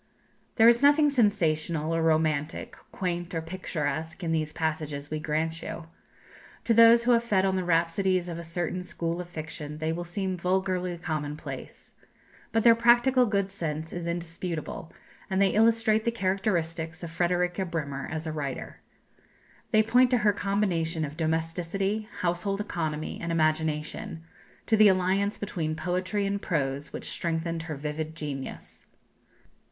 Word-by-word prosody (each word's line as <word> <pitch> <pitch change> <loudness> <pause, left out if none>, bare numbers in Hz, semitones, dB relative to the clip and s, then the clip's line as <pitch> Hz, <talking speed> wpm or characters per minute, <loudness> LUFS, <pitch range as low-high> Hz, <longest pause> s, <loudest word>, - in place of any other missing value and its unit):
There 225 0 +6
is 235 0 +6
nothing 290 +1 +5
sensational 165 - +1
or 165 - +1
romantic, 155 -1 0 0.2
quaint 175 -1 -3
or 165 - 0
picturesque, 160 -1 -4
in 165 - -1
these 155 -2 0
passages, 155 -3 -3
we 155 - -1
grant 160 +2 -1
you. 170 - -6 0.8
To 230 - +2
those 230 +1 +7
who 245 - +3
have 235 -1 +4
fed 195 -5 +2
on 190 -1 +1
the 185 - 0
rhapsodies 175 +2 +1
of 170 -1 -5
a - - -6
certain 175 +2 -3
school 170 -1 -3
of 175 - -9
fiction 155 -2 -6
they 160 +1 -1
will 175 +1 -3
seem 185 +2 -3
vulgarly 180 0 0
commonplace. 155 -3 -6 0.6
But 225 - +2
their 235 - +8
practical 240 +2 +4
good 200 -2 0
sense 160 -4 -4
is 175 -1 -4
indisputable, 170 -1 -4 0.4
and 190 -1 0
they 200 -1 +5
illustrate 220 0 +3
the 235 - +2
characteristics 175 -6 -1
of 165 - -5
Frederika 180 +2 0
Bremer 150 -6 -4
as 160 +1 -4
a 160 - -2
writer. 140 -4 -5 0.9
They 215 0 +4
point 245 +3 +4
to 250 - +3
her 210 -2 +3
combination 180 -6 0
of 145 +1 -8
domesticity, 170 +6 -1
household 180 +3 -1
economy, 160 -6 -3
and 170 - -3
imagination; 155 0 -1 0.4
to 220 - +3
the 215 -1 +7
alliance 190 +2 +2
between 165 -6 -3
poetry 185 +4 -1
and 200 0 -1
prose 140 -2 -2
which - - -5
strengthened 165 0 -2
her 160 -2 -5
vivid 155 +2 -4
genius. 145 -4 -7
170 Hz, 150 wpm, -28 LUFS, 160-200 Hz, 0.9 s, their